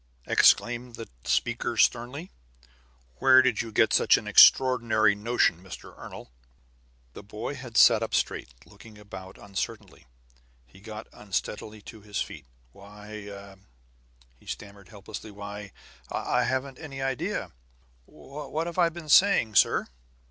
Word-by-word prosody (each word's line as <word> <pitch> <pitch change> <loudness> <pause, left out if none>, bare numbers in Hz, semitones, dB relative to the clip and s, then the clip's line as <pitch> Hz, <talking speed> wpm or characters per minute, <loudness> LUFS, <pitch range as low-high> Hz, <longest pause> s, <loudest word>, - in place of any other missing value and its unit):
exclaimed 120 0 +3
the 115 - -8 0.2
speaker 120 -1 -1
sternly. 125 - 0 0.9
"Where 130 -1 +6
did 130 -4 +1
you 115 - -7
get - - +3
such - - +5
an - - -7
extraordinary 115 -5 +5
notion, 105 -5 +1
Mr. 95 -2 -11
Ernol?" - - -11 0.8
The - - -10
boy 105 +6 -6
had 130 -4 -7
sat 115 -2 +7
up 115 - -2
straight, - - -1 0.2
looking 110 -2 -16
about 95 -2 -11
uncertainly. 100 -9 -6 0.6
He - - -19
got 110 +1 -9
unsteadily 105 +1 -5
to 110 0 -12
his 105 0 -5
feet. 70 -4 -6 0.2
"Why 100 0 -11 0.4
" - - -33
he - - -23
stammered 100 -2 -9
helplessly. 105 +1 -9
"Why, 100 0 -9 0.4
I - - 0
haven't 130 +1 -3
any 145 -4 -8
idea 135 - -3 0.5
What 150 - -6
have 170 +1 -5
I 170 -1 +4
been 165 -1 -10
saying, 170 - +5
sir?" - - +3
110 Hz, 135 wpm, -27 LUFS, 100-130 Hz, 0.9 s, sat